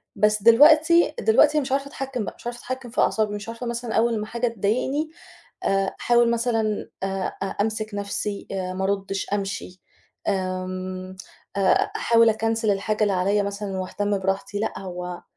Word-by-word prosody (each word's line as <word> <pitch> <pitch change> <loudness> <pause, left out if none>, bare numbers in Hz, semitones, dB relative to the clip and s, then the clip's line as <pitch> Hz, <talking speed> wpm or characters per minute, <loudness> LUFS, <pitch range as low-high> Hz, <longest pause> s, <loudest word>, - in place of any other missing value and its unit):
بس 210 -1 +2
دلوقتي، 310 +8 +6
دلوقتي 310 -10 +4
مش 265 -3 -4
عارفة 275 +1 0
أتحكم 270 -5 -4
بقى - - -6
مش - - -17
عارفة 240 0 -5
أتحكّم 255 0 -6
في - - 0
أعصابي 210 -1 +1
مش 205 +2 -7
عارفة 230 +2 -6
مثلًا 235 -1 -3
أول 230 0 +2
ما 210 - -3
حاجة 235 +2 -1
تضايقني 240 +8 -1 0.6
آآ 195 0 +1
أحاول 240 -1 +4
مثلًا 225 -3 0
آآ 195 -1 -2
أ - - +1 0.2
أمسك 215 0 -1
نَفسي، 200 0 -3
آآ 185 -1 -3
ما 190 - -2
أردِّش، 195 0 -1
أمشي، 195 -2 -3 0.5
آمم 185 0 -3 0.4
آآ 195 -1 +3
أحاول 230 0 +4
أكنسل 225 0 +1
الحاجة 210 +2 0
اللي 205 -2 +3
عليَّ 200 +3 +2
مثلًا 200 -1 -4
وأهتم 205 +2 -1
براحتي، 195 +1 -2
لأ 220 - -2
هو 180 -2 -6
210 Hz, 165 wpm, -24 LUFS, 195-235 Hz, 0.6 s, دلوقتي